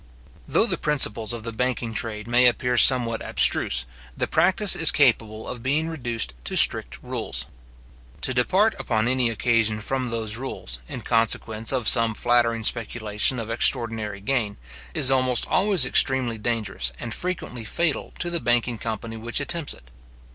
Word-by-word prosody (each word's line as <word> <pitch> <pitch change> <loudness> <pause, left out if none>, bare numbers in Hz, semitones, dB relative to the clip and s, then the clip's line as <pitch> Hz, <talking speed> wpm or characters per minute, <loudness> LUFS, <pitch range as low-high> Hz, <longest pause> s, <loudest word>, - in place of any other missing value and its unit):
Though - - +2
the - - -3
principles 120 -7 0
of 115 -2 -6
the 115 - -5
banking 120 0 -3
trade 110 -1 -3
may 125 +1 +3
appear 125 +1 0
somewhat 120 -2 +5
abstruse, - - +1 0.3
the - - 0
practice 190 0 +3
is 165 - +6
capable 110 -6 +1
of 120 - -6
being 150 +6 -1
reduced 120 - -2
to - - -3
strict - - +5
rules. 60 0 -3 0.8
To 130 - -1
depart 190 - +1
upon 110 0 -1
any 130 -1 +1
occasion 115 -1 0
from 130 +3 -3
those 115 -2 -2
rules, 90 - -5
in - - -7
consequence 115 -1 0
of 125 -5 -1
some 115 -2 +7
flattering 120 -1 0
speculation 110 +1 0
of 115 -1 -5
extraordinary 115 -4 +1
gain, 110 -2 -2 0.4
is 130 - +2
almost 130 -2 +1
always 190 -7 +2
extremely 125 -3 0
dangerous 110 - -2
and 115 - -5
frequently 170 -9 -5
fatal 160 +7 -2
to 175 - -3
the 170 - 0
banking 120 -1 -1
company 115 0 -6
which 115 +4 -2
attempts 160 +1 -2
it. - - -21
120 Hz, 155 wpm, -23 LUFS, 110-130 Hz, 0.8 s, some